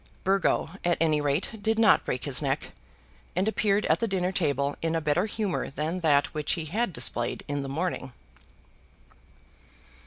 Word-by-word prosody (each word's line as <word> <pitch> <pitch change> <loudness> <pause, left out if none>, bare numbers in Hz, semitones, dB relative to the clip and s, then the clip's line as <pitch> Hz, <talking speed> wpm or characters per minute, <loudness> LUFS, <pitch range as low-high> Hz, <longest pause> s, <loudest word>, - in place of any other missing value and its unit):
Burgo, 190 -4 +1
at 175 -1 +2
any 155 -2 +2
rate, 150 +9 -1
did 220 +1 +1
not 225 -1 +5
break - - -2
his - - +2
neck, - - -2 0.6
and 185 +3 +1
appeared 210 -1 +1
at 160 - +2
the 230 - 0
dinner 185 -2 0
table 145 -6 0
in 165 0 0
a - - +2
better 150 +6 +1
humour 210 -3 -2
than 155 +6 -3
that 145 -4 +2
which 150 -1 -1
he 165 -3 -3
had 210 +7 -1
displayed 120 -3 -2
in 145 0 -2
the 135 - -5
morning. 150 -3 -2
165 Hz, 165 wpm, -27 LUFS, 145-195 Hz, 0.6 s, not